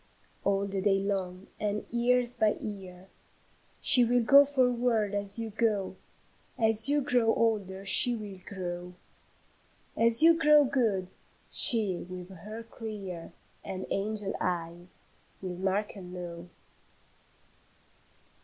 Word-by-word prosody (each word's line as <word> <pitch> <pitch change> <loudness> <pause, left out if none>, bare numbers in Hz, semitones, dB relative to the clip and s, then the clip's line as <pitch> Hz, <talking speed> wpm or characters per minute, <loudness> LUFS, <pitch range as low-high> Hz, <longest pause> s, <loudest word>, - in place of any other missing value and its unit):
"All 200 0 0
the 195 -1 -4
day 195 0 +1
long, 195 -1 -4
and 210 0 -3
year 245 +1 +1 0.2
by 215 -2 +2
year, 190 -3 -10 0.7
She 250 - +6
will 240 0 +1
go 280 +4 +7
forward 245 -6 0
as 200 0 0
you 225 -1 -4
go; 205 -3 -2 0.6
As 225 +1 +4
you 290 0 +1
grow 245 -4 +1
older, 200 -4 -2
she 240 +4 +3
will 205 -4 -9
grow; 180 -2 -7 1.0
As 230 +4 +5
you 335 +1 +7
grow 300 -2 +4
good, 235 -9 -1 0.5
she 210 -6 +7
with 180 0 -9
her 210 +5 -10
clear 205 -7 -9 0.3
And 190 -1 -7
angel 205 0 -3
eyes, 175 0 -5 0.4
will 180 -2 -7
mark 195 +3 -2
and 180 -3 -11
know. 175 -1 -9
205 Hz, 120 wpm, -28 LUFS, 185-230 Hz, 1.0 s, go